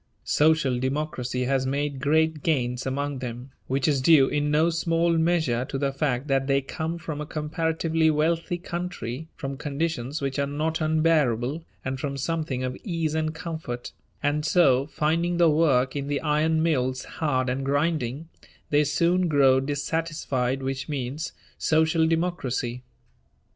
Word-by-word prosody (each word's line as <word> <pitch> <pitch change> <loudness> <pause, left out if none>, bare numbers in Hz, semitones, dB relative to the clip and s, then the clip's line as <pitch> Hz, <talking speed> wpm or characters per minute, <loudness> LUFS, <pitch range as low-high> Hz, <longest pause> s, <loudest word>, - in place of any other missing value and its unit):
Social 150 -5 +3
Democracy 130 -2 -2
has 130 0 +1
made 140 0 -1
great 160 +2 +2
gains 125 -5 0
among 140 +1 -2
them, 125 +1 -6 0.2
which 135 0 0
is 140 -3 +2
due 140 -1 +6
in 145 0 0
no 155 +3 +3
small 165 0 +1
measure 160 -7 +1
to 135 - -4
the 135 0 -1
fact 135 -2 -1
that 135 -1 +1
they 140 0 +3
come 160 +4 -4
from 155 -3 -5
a - - -3
comparatively 160 +1 0
wealthy 165 +3 +1
country, 175 -6 -5
from 135 -2 -5
conditions 150 -1 -2
which 135 0 -2
are 140 - +1
not 155 +3 -2
unbearable, 155 -3 +2 0.2
and 130 0 -2
from 140 0 -3
something 145 -3 -2
of 130 0 -2
ease 165 -5 -1
and 155 0 -1
comfort; 160 -8 -5 0.3
and 150 +1 +1
so, 140 -5 +4
finding 165 +3 0
the 170 -2 +5
work 135 -5 +2
in 140 -1 -3
the 145 -1 0
iron 160 +1 +2
mills 130 -5 0
hard 130 -5 -1
and 130 +2 -1
grinding, 145 0 -1 0.4
they 150 0 +4
soon 170 +5 +2
grow 135 -4 +5
dissatisfied, 140 -2 -2
which 135 +1 -3
means 145 +2 -3 0.3
Social 160 +1 +3
Democracy. 140 -8 -1
150 Hz, 150 wpm, -25 LUFS, 135-160 Hz, 0.4 s, due